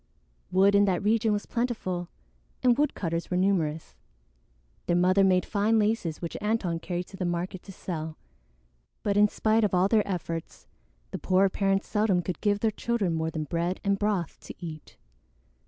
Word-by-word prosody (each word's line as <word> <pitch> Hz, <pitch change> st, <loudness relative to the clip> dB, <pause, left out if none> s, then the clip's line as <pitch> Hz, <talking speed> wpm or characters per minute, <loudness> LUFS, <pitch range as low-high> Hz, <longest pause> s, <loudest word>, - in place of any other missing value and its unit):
Wood 195 Hz, +2 st, +4 dB
in 200 Hz, 0 st, +5 dB
that 190 Hz, -1 st, 0 dB
region 220 Hz, +1 st, +2 dB
was 205 Hz, 0 st, -1 dB
plentiful, 215 Hz, -8 st, -2 dB, 0.5 s
and 245 Hz, -1 st, +5 dB
woodcutters 175 Hz, -, -1 dB
were 180 Hz, -, 0 dB
numerous. 170 Hz, -5 st, 0 dB, 0.9 s
Their 175 Hz, -, +2 dB
mother 185 Hz, +2 st, +4 dB
made 185 Hz, -2 st, +3 dB
fine 215 Hz, +2 st, +1 dB
laces 210 Hz, -7 st, 0 dB
which 170 Hz, -, -4 dB
Antone 205 Hz, -6 st, 0 dB
carried 175 Hz, +1 st, -3 dB
to 190 Hz, -, -11 dB
the 185 Hz, -, -3 dB
market 175 Hz, +1 st, -3 dB
to 195 Hz, -, -11 dB
sell; 160 Hz, -4 st, -5 dB, 0.9 s
but 200 Hz, -1 st, +1 dB
in 210 Hz, +1 st, +6 dB
spite 220 Hz, +2 st, +1 dB
of 205 Hz, -3 st, +2 dB
all 180 Hz, +1 st, +4 dB
their 215 Hz, 0 st, +2 dB
efforts, 165 Hz, -3 st, -5 dB, 0.5 s
the -, -, -4 dB
poor 190 Hz, +1 st, +3 dB
parents 195 Hz, 0 st, 0 dB
seldom 210 Hz, -4 st, +1 dB
could 180 Hz, -3 st, -4 dB
give 205 Hz, -1 st, +1 dB
their 225 Hz, -, +2 dB
children 215 Hz, -5 st, -1 dB
more 160 Hz, 0 st, -1 dB
than 160 Hz, -1 st, -3 dB
bread 170 Hz, +4 st, -2 dB
and 200 Hz, 0 st, +1 dB
broth 205 Hz, -5 st, -1 dB
to -, -, -10 dB
eat. 160 Hz, -3 st, -9 dB
190 Hz, 170 wpm, -27 LUFS, 175-210 Hz, 0.9 s, in